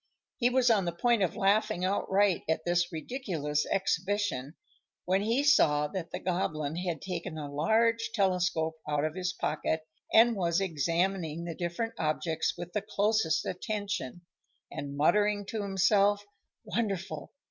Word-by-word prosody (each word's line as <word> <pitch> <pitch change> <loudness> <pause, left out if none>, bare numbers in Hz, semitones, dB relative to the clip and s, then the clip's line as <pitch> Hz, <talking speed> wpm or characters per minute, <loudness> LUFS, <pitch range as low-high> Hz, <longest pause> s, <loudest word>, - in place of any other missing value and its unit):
He 245 -1 +3
was 250 -1 +3
on 200 -4 +3
the 170 - 0
point 230 +6 +2
of 185 - +1
laughing 200 -3 +2
outright 195 0 +2
at 160 0 0
this 175 0 +1
ridiculous 160 - -2
exhibition, 190 -6 -1 0.5
when 190 +2 +2
he 230 +6 +1
saw 150 - +4
that 175 -2 -5
the - - -4
Goblin 160 -4 -2
had 175 -3 -3
taken 180 -3 -4
a 150 -2 -5
large 225 +9 +2
telescope 180 -6 +1
out 150 0 +1
of 155 - -2
his 180 0 -2
pocket, 155 0 -1 0.3
and 230 +1 +6
was 170 -3 +1
examining 170 -1 -1
the 170 -1 -4
different 175 +8 -3
objects 160 +1 -1
with 175 0 -7
the 210 - 0
closest 210 -3 +1
attention, 200 - -3 0.5
and 140 0 -6
muttering 205 +6 +2
to 220 - -3
himself, 200 +1 +2 0.4
"Wonderful! 200 -5 -3
185 Hz, 145 wpm, -30 LUFS, 160-205 Hz, 0.5 s, and